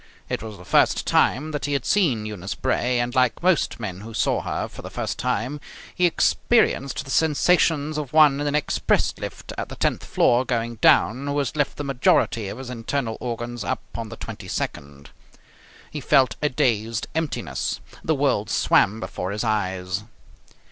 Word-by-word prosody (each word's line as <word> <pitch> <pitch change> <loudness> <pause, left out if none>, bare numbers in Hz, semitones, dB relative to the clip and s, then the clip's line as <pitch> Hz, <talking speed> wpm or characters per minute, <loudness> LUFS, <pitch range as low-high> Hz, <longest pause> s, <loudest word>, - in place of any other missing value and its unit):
It - - -2
was 110 -2 -8
the - - -13
first - - +3
time 150 +5 +2
that 150 -2 -3
he 145 - -1
had 140 -3 -1
seen 140 - +2
Eunice 100 -3 -5
Bray, 125 -1 0
and, 120 0 -1
like 130 +3 +1
most 180 -8 +2
men 95 -4 -5
who 110 +1 -9
saw - - +1
her - - -3
for - - -11
the - - -8
first - - -4
time, 130 +8 -2 0.3
he 180 0 +3
experienced 170 - +1
the 135 - -7
sensations 155 +1 +2
of 140 -4 -5
one 150 -3 +6
in 145 - -1
an 145 - 0
express 150 - +1
lift - - -7
at - - -4
the - - -7
tenth - - 0
floor 120 +1 +3
going 115 -2 -2
down 125 +5 +3
who 145 0 -1
has 140 -1 -1
left 145 -2 0
the 145 - -3
majority 125 -5 +2
of 100 - -6
his 130 -1 -7
internal 115 0 -2
organs 120 -1 -4
up - - -2
on 115 -2 -5
the 115 - -7
twenty 105 -4 -8
second. 70 -5 -5 0.8
He - - -5
felt 130 -5 +3
a 150 - +2
dazed 115 -3 0
emptiness. 160 -2 -2 0.2
The 160 - +1
world 135 -8 +1
swam 105 +4 +3
before 95 -1 -4
his 105 +3 -3
eyes. 95 -3 -1
125 Hz, 180 wpm, -23 LUFS, 110-145 Hz, 0.8 s, one